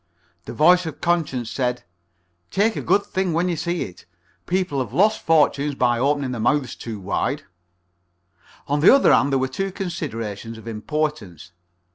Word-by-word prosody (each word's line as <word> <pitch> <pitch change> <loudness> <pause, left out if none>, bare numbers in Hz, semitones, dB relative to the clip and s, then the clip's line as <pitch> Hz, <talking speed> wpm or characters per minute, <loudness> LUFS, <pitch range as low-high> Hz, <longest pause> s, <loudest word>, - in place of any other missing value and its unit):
The - - -7
voice 180 +3 +4
of 155 - -7
conscience 155 -9 -1
said: 125 -2 -2 0.7
"Take 220 +3 +1
a - - -3
good 200 - +2
thing 190 -3 -1
when 170 +3 +1
you 175 - 0
see 170 +2 -2
it. 90 -2 -11 0.4
People 180 -6 0
have 125 -3 -4
lost 210 +8 +3
fortunes 150 -2 +2
by 120 -2 +1
opening 140 0 0
their 120 -3 -4
mouths 135 +3 +1
too 110 -3 -7
wide." 95 +1 -2 1.2
On 145 +1 0
the 155 - +7
other 275 - +5
hand 140 +2 +3
there 135 - +3
were 130 0 0
two 195 +7 -3
considerations 115 - -5
of 110 - -12
importance. 110 - -4
145 Hz, 165 wpm, -22 LUFS, 120-175 Hz, 1.2 s, the